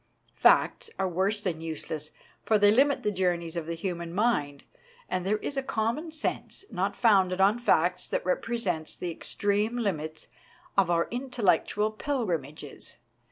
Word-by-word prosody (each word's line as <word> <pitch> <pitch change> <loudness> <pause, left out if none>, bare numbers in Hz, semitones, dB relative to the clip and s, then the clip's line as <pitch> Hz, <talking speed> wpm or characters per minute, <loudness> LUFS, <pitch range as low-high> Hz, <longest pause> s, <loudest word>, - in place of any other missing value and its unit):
Facts - - +3
are 190 - +1
worse 190 +4 0
than 170 -5 -2
useless, 155 -1 -5 0.3
for 220 - +3
they 205 0 +6
limit 275 +5 +3
the 210 - +1
journeys 175 -3 -1
of 165 -2 -3
the 170 - -2
human 170 -1 -4
mind; 150 -11 +1 0.4
but 185 - -2
there 205 +3 +1
is 275 +6 -5
a - - +2
common 265 +6 -2
sense 315 +4 -4
not 200 0 -1
founded 190 -5 +3
on 200 +4 +4
facts 180 -5 +2
that - - -2
represents 185 -4 -1
the 175 - -4
extreme 205 +7 -1
limits 160 -8 -3 0.5
of 195 -3 +4
our 170 -1 +3
intel 250 -1 -4
lectual 210 +3 +2
pilgrimages. 165 - -3
190 Hz, 155 wpm, -28 LUFS, 170-225 Hz, 0.5 s, they